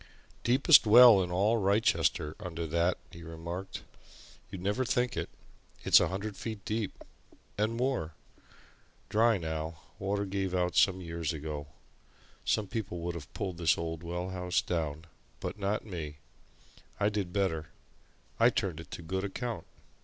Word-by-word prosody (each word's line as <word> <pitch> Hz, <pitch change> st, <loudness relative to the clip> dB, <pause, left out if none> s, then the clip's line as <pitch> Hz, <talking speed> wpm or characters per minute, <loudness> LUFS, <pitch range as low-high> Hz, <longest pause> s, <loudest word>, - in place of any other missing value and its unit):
"Deepest 135 Hz, +1 st, +6 dB
well 115 Hz, -2 st, +9 dB
in 90 Hz, -, -2 dB
all 100 Hz, +6 st, +2 dB
Wrychester 85 Hz, -7 st, +2 dB
under 85 Hz, -4 st, -4 dB
that," 85 Hz, +3 st, +1 dB
he 85 Hz, -, -11 dB
remarked. 85 Hz, +3 st, -6 dB, 0.7 s
"You'd 95 Hz, -2 st, -7 dB
never 105 Hz, +7 st, +1 dB
think 125 Hz, -1 st, 0 dB
it -, -, -3 dB, 0.5 s
it's -, -, +7 dB
a -, -, +2 dB
hundred 100 Hz, +2 st, -4 dB
feet 110 Hz, -3 st, -6 dB
deep 110 Hz, -2 st, -1 dB, 0.6 s
and 110 Hz, +2 st, 0 dB
more! 120 Hz, -, -1 dB, 0.9 s
Dry 115 Hz, 0 st, +4 dB
now 80 Hz, -1 st, -4 dB, 0.2 s
water 100 Hz, +1 st, -1 dB
gave 95 Hz, -1 st, -2 dB
out 90 Hz, -1 st, 0 dB
some 95 Hz, -1 st, +4 dB
years 85 Hz, -2 st, -3 dB
ago. 75 Hz, -1 st, -5 dB, 0.8 s
Some 110 Hz, -, +1 dB
people 100 Hz, -3 st, -4 dB
would 85 Hz, +1 st, -2 dB
have 80 Hz, -5 st, -8 dB
pulled 95 Hz, -5 st, -4 dB
this 85 Hz, -2 st, +3 dB
old 80 Hz, -1 st, -4 dB
well 90 Hz, +1 st, -4 dB
house 90 Hz, -1 st, 0 dB
down 80 Hz, -2 st, -2 dB, 0.3 s
but -, -, -5 dB
not 100 Hz, +2 st, -1 dB
me! 80 Hz, -7 st, -6 dB, 0.8 s
I 100 Hz, 0 st, +3 dB
did 100 Hz, -4 st, -2 dB
better 90 Hz, -6 st, 0 dB, 0.7 s
I -, -, +7 dB
turned 90 Hz, -5 st, -2 dB
it 80 Hz, -3 st, -10 dB
to 85 Hz, -, -7 dB
good 95 Hz, +4 st, -2 dB
account." 110 Hz, -1 st, -4 dB
95 Hz, 150 wpm, -31 LUFS, 85-105 Hz, 0.9 s, well